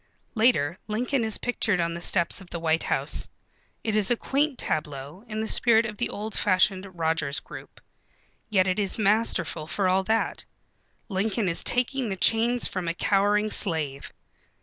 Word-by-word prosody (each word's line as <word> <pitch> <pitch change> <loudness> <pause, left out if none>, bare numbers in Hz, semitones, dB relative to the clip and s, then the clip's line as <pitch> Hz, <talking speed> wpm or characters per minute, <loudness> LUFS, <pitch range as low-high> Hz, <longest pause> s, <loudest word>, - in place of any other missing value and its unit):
Later 190 - +2
Lincoln 245 +4 -1
is 220 -1 -1
pictured 220 -6 0
on 170 0 0
the 170 - -6
steps 175 +2 +1
of 185 - -14
the 170 - -5
White 165 0 +1
House. - - -1 0.5
It 220 -2 -1
is 210 -3 +3
a 240 - +4
quaint 280 +2 0
tableau, 150 +3 -4
in 215 0 -3
the 220 - -2
spirit 230 -1 +4
of 210 -2 -6
the 240 - -1
old 215 +1 -5
fashioned 190 0 +2
Rogers 160 -3 0
group. - - -12 0.7
Yet 190 -3 +3
it 185 +3 0
is 200 -2 0
masterful 210 -7 +1
for 195 +3 0
all 190 +1 +2
that. 225 +2 0 0.6
Lincoln 205 +1 -1
is 170 - -1
taking 250 0 0
the 195 - -2
chains 230 +5 +2
from 185 -2 -4
a 170 - -1
cowering 205 +2 +2
slave. 150 -9 +1
200 Hz, 170 wpm, -26 LUFS, 170-225 Hz, 0.7 s, a